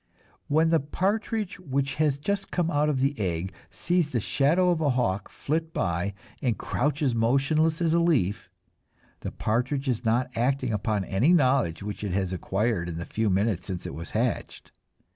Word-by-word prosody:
When 160 +3 +3
the 165 - +4
partridge 200 - -1
which 140 -4 -1
has 145 -3 +2
just 195 +7 -2
come 175 -2 0
out 150 0 +2
of 135 -3 0
the 140 +2 +2
egg 90 -1 -2 0.2
sees 175 -3 0
the 125 - 0
shadow 165 - +2
of 170 - 0
the 150 -3 +2
hawk 100 -7 0
flit 160 +2 -3
by 90 +3 -1 0.3
and 120 -4 0
crouches 145 0 0
motionless 140 +8 +2
as 165 -1 +2
a 170 - +4
leaf, 135 - +1 0.7
the - - -4
partridge 130 +5 -1
is 125 -3 0
not 120 +3 +1
acting 130 0 0
upon 105 -1 -1
any 120 - +3
knowledge 130 - +2
which 105 0 -5
it 100 -4 -2
has 95 -1 -1
acquired 95 0 -1
in 80 - -5
the 85 - -4
few 110 -1 -1
minutes 100 0 0
since 90 -3 -5
it - - -5
was 80 +4 -7
hatched. - - -2
130 Hz, 180 wpm, -27 LUFS, 100-155 Hz, 0.7 s, the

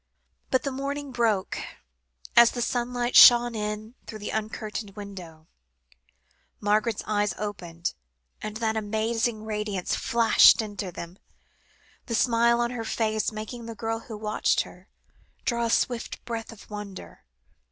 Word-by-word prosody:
But 260 - +1
as 275 - -2
morning 280 +1 -4
broke, 225 -6 0 0.8
as 235 0 +8
the 245 - -4
sunlight 245 0 -1
shone 240 0 +9
in 210 +1 -4
through 215 - -7
the 210 - -5
uncurtained 215 -1 -4
window, 185 -6 -9 1.1
Margaret's 210 +1 +1
eyes 205 -3 0
opened, 175 -5 -4 0.5
and 215 0 -5
that 225 -1 0
amazing 220 +1 -1
radiance 210 -4 -2
flashed 230 -1 +5
into 205 -4 -4
them, 170 +2 -9 0.9
the 230 - -1
smile 235 +1 +3
on 240 0 0
her 240 -2 -4
face 220 -1 -1
making 220 +2 -7
the 230 - -6
girl 225 +1 -2
who 225 -1 -9
watched 210 0 +1
her, - - -12 0.6
draw 235 -1 +1
a - - -3
swift 235 +1 -1
breath 230 -1 -5
of 225 - -14
wonder. 205 -2 -8
220 Hz, 135 wpm, -26 LUFS, 210-235 Hz, 1.1 s, shone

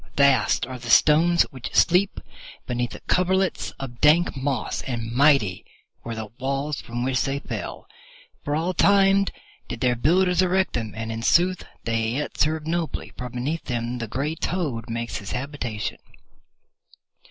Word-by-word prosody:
Vast 140 -5 +4
are 130 0 -7
the 120 -1 -8
stones 165 +7 +5
which 130 -4 -8
sleep 180 +3 +3 0.5
beneath 120 -1 -3
coverlets 190 +1 +1
of 125 -3 -8
dank 155 +3 +4
moss, 135 -3 -2
and 115 -3 -4
mighty 125 -7 +3 0.4
were 115 -1 -5
the 110 0 -4
walls 140 +2 -2
from 120 +1 -4
which 130 0 +1
they 135 0 -1
fell. - - -6 0.6
For 145 - -1
all 170 +4 0
time 195 +1 +4 0.4
did - - -6
their 125 0 +2
builders 180 +7 +3
erect 185 +1 +1
them, 110 -3 -3
and 115 0 -4
in 115 0 -4
sooth 180 +8 +3 0.2
they 115 -1 0
yet 150 +3 -3
serve 155 0 +1
nobly, 165 0 -3
for 125 0 -6
beneath 130 +7 -3
them 120 0 -3
the 115 - -4
grey 140 +8 -2
toad 150 -11 -3
makes 115 0 -3
his 100 - -6
habitation. 125 -4 -4
135 Hz, 155 wpm, -24 LUFS, 120-165 Hz, 0.6 s, stones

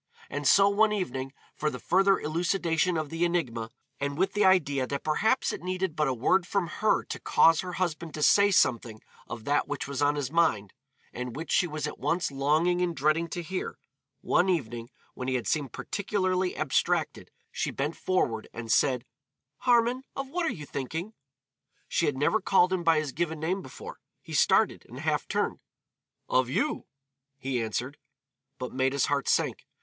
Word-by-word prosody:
And 145 -1 -2
so, 195 0 +6
one 210 +2 +3
evening, 135 -10 -3 0.2
for 150 - 0
the 125 - -6
further 195 +7 +3
elucidation 170 +1 0
of 155 -2 -3
the 165 +1 -1
enigma, 125 -11 -1 0.3
and 140 0 -2
with 190 +3 +1
the 210 - +2
idea 145 -9 +3
that 140 +1 -4
perhaps 220 +12 +1
it - - -6
needed 185 -2 -2
but 150 -1 +1
a 130 - +1
word 175 +10 +2
from 200 -3 0
her 215 +7 +1
to - - -6
cause 165 -1 +4
her 180 -1 -6
husband 170 -3 -3
to 150 - -2
say 200 +5 +6
something 115 - +1 0.3
of 115 -2 -7
that 145 +1 +1
which 145 -1 -4
was 140 0 -4
on 145 0 +3
his 145 -2 -3
mind, 110 - +1 0.4
and 125 -1 -5
which 160 +4 -6
she 180 - +3
was 155 -2 -4
at 150 - -6
once 170 -3 0
longing 155 +6 +2
and 175 -2 0
dreading 155 +4 +1
to 175 +1 -5
hear 185 +3 -4 0.4
one 185 +2 +2
evening 120 -9 -2 0.2
when 125 - -6
he 130 - 0
had 125 - -2
seemed 145 -6 -1
particularly 185 -3 -1
abstracted, 155 -4 0 0.2
she - - -2
bent 145 +4 -3
forward 120 -12 -1
and 115 -1 -5
said, 130 -2 +2 0.5
"Harmon, 245 +1 +2
of 275 0 -4
what 345 +3 -1
are - - +1
you 150 -4 -7
thinking?" 160 - -5 0.7
She 165 - +1
had 145 -3 -1
never 150 +10 +2
called 185 -1 +3
him 180 -2 -1
by 165 -1 +4
his 155 -3 -1
given 160 +1 -2
name 180 +5 -1
before. 130 - -10 0.2
He - - -9
started, - - +3
and - - -8
half - - -1
turned. - - -1 0.7
"Of 130 -1 +2
you," 135 - -1 0.5
he 130 -3 -2
answered. 120 +5 -3 0.6
But 125 -2 -6
Maida's 130 +1 +1
heart 140 -3 0
sank. - - 0
155 Hz, 185 wpm, -28 LUFS, 135-185 Hz, 0.7 s, so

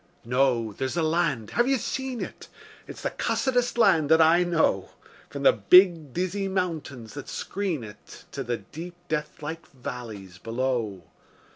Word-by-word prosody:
No! 120 -3 +1
There's 130 +7 -3
the 170 - +1
land. 155 -8 0
(Have 240 +1 +2
you 270 0 +3
seen 260 0 -3
it?) - - -7 0.4
It's - - -9
the - - -1
cussedest 245 -2 0
land 160 -10 +4
that 160 0 +6
I 165 +2 +6
know, 170 -2 +1 0.4
From - - -6
the - - +7
big, 175 - +5
dizzy 185 +5 -2
mountains 160 - -3
that 145 - -8
screen 185 - -3
it 105 -1 -12
To 140 - -4
the 120 -1 -2
deep, 170 +7 -9
deathlike 155 +1 -4
valleys 110 -8 -8
below. 115 -4 -2
155 Hz, 150 wpm, -26 LUFS, 125-180 Hz, 0.4 s, the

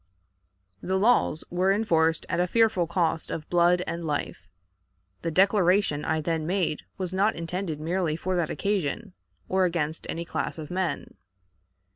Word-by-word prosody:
The 190 +1 0
laws 200 -7 +3
were 185 +2 +2
enforced 165 -6 +2
at 170 - -1
a 180 - +2
fearful 215 -4 +2
cost 165 -2 0
of 155 -1 -5
blood 175 +1 +4
and 170 0 -4
life. 145 - -3 0.7
The 170 - -2
declaration 185 -3 +3
I 160 0 0
then 160 0 -1
made 175 -5 0 0.2
was 185 -1 -3
not 200 +3 +2
intended 165 -1 -4
merely 165 0 -1
for 185 +3 -2
that 170 -3 0
occasion, 175 - -2 0.3
or 190 0 +2
against 160 -3 -2
any 170 +1 -3
class - - -3
of 155 0 -7
men. 185 -1 -2
175 Hz, 150 wpm, -26 LUFS, 160-190 Hz, 0.7 s, blood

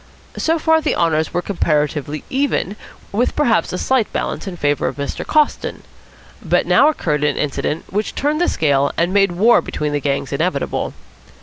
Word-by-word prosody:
So 325 +1 +1
far 320 0 +3
the - - 0
honours 160 -2 +1
were 175 - -1
comparatively 150 -5 -1
even, 265 -7 -1 0.4
with 235 +5 0
perhaps 230 - +2
a 180 - -3
slight 255 +2 +1
balance - - -3
in 180 -2 -5
favour 145 -2 0
of - - -3
Mr. 140 0 -4
Coston. 305 -1 0 0.6
But - - +1
now 295 - +5
occurred 150 - -1
an 145 -1 +1
incident 150 +2 -2
which 210 +2 -2
turned 300 +3 0
the 350 - +3
scale, 140 -3 +1
and 175 +2 +1
made 195 -2 +3
war 220 +7 +4
between 150 -1 -3
the 145 - +1
gangs 140 -1 -2
inevitable. - - -1
175 Hz, 175 wpm, -19 LUFS, -, 0.6 s, now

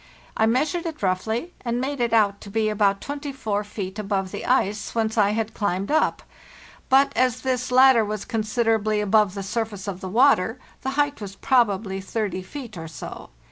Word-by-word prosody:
I 220 - +3
measured 310 +9 0
it 315 -8 -7
roughly, 220 - -1
and 240 -1 -1
made 275 +2 -3
it 235 -1 +1
out 205 -3 +3
to 200 - -10
be 215 +1 0
about 200 -2 +1
24 270 -8 -3
feet 205 -1 -6
above 195 -2 -2
the - - -6
ice 215 -5 0
whence 220 -1 0
I 205 -3 +4
had 225 0 -2
climbed 200 0 -1
up; 315 - +1 0.7
but, 270 +1 +4
as 250 0 +1
this 255 -1 -1
latter 255 -2 +6
was 210 -1 -4
considerably 220 -2 0
above 210 -1 +3
the 195 - -4
surface 210 -1 -3
of 190 -2 -5
the 185 - -5
water, 225 -1 +3 0.2
the 265 - -2
height 290 -4 +1
was 195 -1 -7
probably 200 -5 +1
30 200 -2 -3
feet 230 +1 -9
or 165 - -6
so. 160 - -9
220 Hz, 180 wpm, -24 LUFS, 200-250 Hz, 0.7 s, latter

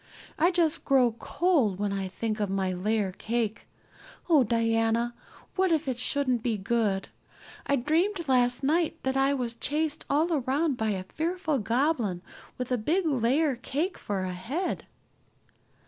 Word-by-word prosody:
I 335 +3 +5
just 335 -3 +1
grow 260 -4 +4
cold 285 - +1
when 205 0 -1
I 195 -1 -2
think 215 +3 -3
of 205 -2 0
my 190 -1 0
layer 200 +2 0
cake. 225 +2 -3 0.6
Oh, 310 -6 +5
Diana, 230 +1 +1 0.4
what 375 -1 +2
if 315 -3 +1
it 250 -2 -2
shouldn't 255 -2 0
be 225 -2 0
good! 200 -1 0 0.6
I 280 - +3
dreamed 335 +7 0
last 245 0 +2
night 325 +3 +1
that 265 0 0
I 270 +1 +3
was 245 -3 -2
chased 300 +6 -2
all 315 +4 +2
around 280 +2 +1
by 220 -2 -1
a 190 -3 -2
fearful 320 - -2
goblin 230 - 0 0.3
with 250 0 -4
a 250 - +1
big 335 - +1
layer 275 +1 +2
cake 295 +9 -2
for 195 -2 -2
a 185 -1 -3
head." 270 - -3
250 Hz, 155 wpm, -28 LUFS, 220-310 Hz, 0.6 s, I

